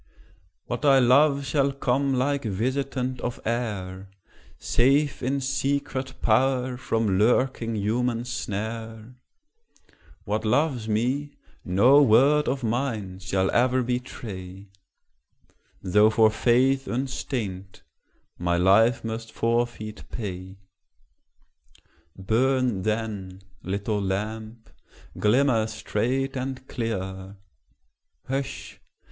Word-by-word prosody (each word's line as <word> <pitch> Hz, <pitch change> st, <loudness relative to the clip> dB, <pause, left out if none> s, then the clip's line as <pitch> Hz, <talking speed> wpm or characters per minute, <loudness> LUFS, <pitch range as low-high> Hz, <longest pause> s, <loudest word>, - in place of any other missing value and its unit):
What 120 Hz, +3 st, -4 dB
I 140 Hz, -2 st, +6 dB
love 140 Hz, +3 st, +4 dB
shall 140 Hz, 0 st, +1 dB
come 135 Hz, 0 st, 0 dB
like 140 Hz, +2 st, 0 dB
visitant 130 Hz, +4 st, -2 dB
of 120 Hz, -, -4 dB
air, 100 Hz, -5 st, -3 dB, 0.5 s
Safe 140 Hz, +4 st, +2 dB
in 135 Hz, +2 st, -1 dB
secret 135 Hz, 0 st, -2 dB
power 125 Hz, +2 st, +2 dB
from 110 Hz, -6 st, 0 dB
lurking 115 Hz, 0 st, +1 dB
human 115 Hz, +3 st, -1 dB
snare; 115 Hz, -1 st, -5 dB, 1.1 s
What 105 Hz, +1 st, -2 dB
loves 120 Hz, 0 st, +1 dB
me, 130 Hz, +7 st, -1 dB, 0.3 s
no 120 Hz, +11 st, +5 dB
word 140 Hz, +5 st, +4 dB
of 130 Hz, 0 st, -1 dB
mine 110 Hz, -6 st, -2 dB
shall 95 Hz, 0 st, 0 dB
e'er 125 Hz, +1 st, +2 dB
betray, 100 Hz, -6 st, -6 dB, 1.1 s
Though 105 Hz, +3 st, +4 dB
for 110 Hz, -1 st, +4 dB
faith 130 Hz, +4 st, +2 dB
unstained 115 Hz, -7 st, -4 dB, 0.6 s
my 85 Hz, 0 st, +1 dB
life 110 Hz, +6 st, +4 dB
must 115 Hz, 0 st, -5 dB
forfeit 115 Hz, -2 st, -2 dB
pay 95 Hz, -3 st, -6 dB, 1.6 s
Burn, 120 Hz, +2 st, +1 dB
then, 100 Hz, -3 st, -3 dB, 0.2 s
little 100 Hz, +2 st, -2 dB
lamp; 110 Hz, +3 st, -4 dB, 0.5 s
glimmer 115 Hz, 0 st, +3 dB
straight 125 Hz, +5 st, -2 dB
and 130 Hz, 0 st, -5 dB
clear 95 Hz, -4 st, -4 dB, 0.9 s
Hush! 135 Hz, +1 st, -5 dB
115 Hz, 95 wpm, -25 LUFS, 105-130 Hz, 1.6 s, I